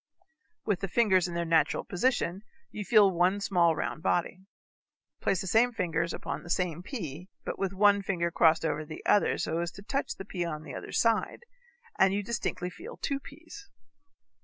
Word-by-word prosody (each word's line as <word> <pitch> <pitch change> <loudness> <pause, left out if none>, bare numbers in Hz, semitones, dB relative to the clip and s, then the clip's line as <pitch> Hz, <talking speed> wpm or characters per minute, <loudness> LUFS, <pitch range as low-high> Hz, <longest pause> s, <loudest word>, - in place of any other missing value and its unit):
With 205 -4 0
the 195 - -3
fingers 190 -3 +3
in 175 - -6
their 170 0 -1
natural 160 -1 +2
position 190 -3 0 0.3
you 210 - -5
feel 205 -1 +5
one 180 +3 +2
small 175 -5 +2
round 155 - -3
body. 185 +2 -1 0.7
Place 185 - +1
the - - -5
same 225 +6 +3
fingers 170 -5 -1
upon - - -5
the 175 - -12
same 175 -2 -1
pea, 180 - -6 0.2
but - - -4
with 195 -2 0
one 200 +1 +4
finger 175 -3 -1
crossed 165 -1 +4
over 155 -1 -1
the 155 0 -10
other 205 - +3
so 165 +1 -1
as 170 0 -1
to 195 - -11
touch 275 +6 -2
the 195 - -8
pea 180 -2 -3
on 155 -2 -4
the - - -9
other - - -7
side, 230 - +1 0.6
and 195 0 +5
you 205 - -1
distinctly 195 -4 -3
feel 460 - -10
two 275 -1 -2
peas. 330 +9 -13
185 Hz, 185 wpm, -29 LUFS, 170-210 Hz, 0.7 s, feel